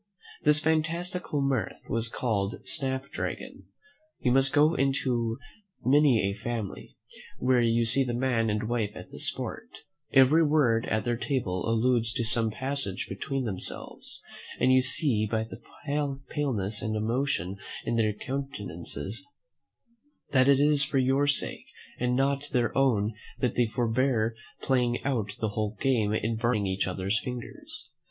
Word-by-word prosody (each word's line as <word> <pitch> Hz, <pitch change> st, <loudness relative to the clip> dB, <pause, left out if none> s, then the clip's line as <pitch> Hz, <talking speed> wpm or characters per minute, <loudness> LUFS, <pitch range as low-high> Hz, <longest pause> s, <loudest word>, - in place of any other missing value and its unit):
This 150 Hz, 0 st, +4 dB
fantastical 160 Hz, 0 st, -1 dB
mirth 135 Hz, -4 st, -1 dB
was 115 Hz, 0 st, -1 dB
called 105 Hz, -4 st, -2 dB
Snap 135 Hz, -2 st, 0 dB
Dragon. -, -, -5 dB, 0.5 s
You 125 Hz, -, +1 dB
may 135 Hz, +2 st, +5 dB
go 150 Hz, +2 st, +5 dB
into 125 Hz, -5 st, 0 dB, 0.5 s
many 135 Hz, -4 st, +5 dB
a 100 Hz, -, -1 dB
family, 115 Hz, -2 st, -5 dB, 0.4 s
where 125 Hz, -1 st, +3 dB
you 115 Hz, 0 st, +3 dB
see 125 Hz, +4 st, +4 dB
the 120 Hz, -2 st, -2 dB
man 120 Hz, -3 st, +1 dB
and 105 Hz, 0 st, 0 dB
wife 110 Hz, -3 st, -1 dB
at 90 Hz, -, -10 dB
this -, -, 0 dB
sport: -, -, -5 dB, 0.4 s
every 140 Hz, +5 st, +6 dB
word 135 Hz, -7 st, +3 dB
at 110 Hz, 0 st, 0 dB
their 120 Hz, -1 st, 0 dB
table 115 Hz, -, -1 dB
alludes 115 Hz, 0 st, +2 dB
to 120 Hz, -, 0 dB
some 110 Hz, 0 st, +2 dB
passage 130 Hz, -4 st, -3 dB
between 135 Hz, +7 st, -3 dB
themselves; 95 Hz, -6 st, -5 dB, 0.4 s
and 130 Hz, +1 st, +4 dB
you 130 Hz, -, +6 dB
see 125 Hz, -4 st, +1 dB
by 110 Hz, 0 st, 0 dB
the 110 Hz, -, -10 dB, 0.7 s
paleness 110 Hz, -9 st, -1 dB
and 110 Hz, -1 st, -2 dB
emotion 110 Hz, -4 st, -1 dB, 0.3 s
in 115 Hz, -, 0 dB
their 110 Hz, -2 st, +2 dB
countenances 105 Hz, -, -5 dB, 1.1 s
that 130 Hz, -1 st, +4 dB
it 140 Hz, -1 st, +6 dB
is 145 Hz, 0 st, +4 dB
for 135 Hz, 0 st, -1 dB
your 135 Hz, +2 st, +3 dB
sake 145 Hz, -, 0 dB, 0.3 s
and 125 Hz, 0 st, +1 dB
not 140 Hz, +2 st, +1 dB
their 120 Hz, -1 st, +1 dB
own 115 Hz, -6 st, +2 dB, 0.3 s
that 125 Hz, -, +1 dB
they 120 Hz, -2 st, +2 dB
forbear 115 Hz, 0 st, +1 dB, 0.3 s
playing 125 Hz, -2 st, +2 dB
out 110 Hz, -7 st, -1 dB
the 110 Hz, -, 0 dB
whole 105 Hz, 0 st, -3 dB
game 115 Hz, -6 st, +2 dB
in 110 Hz, +1 st, 0 dB
burning 115 Hz, -3 st, +1 dB
each 95 Hz, 0 st, 0 dB
other's 95 Hz, +3 st, 0 dB
fingers. 125 Hz, -1 st, -7 dB
120 Hz, 145 wpm, -28 LUFS, 110-135 Hz, 1.1 s, every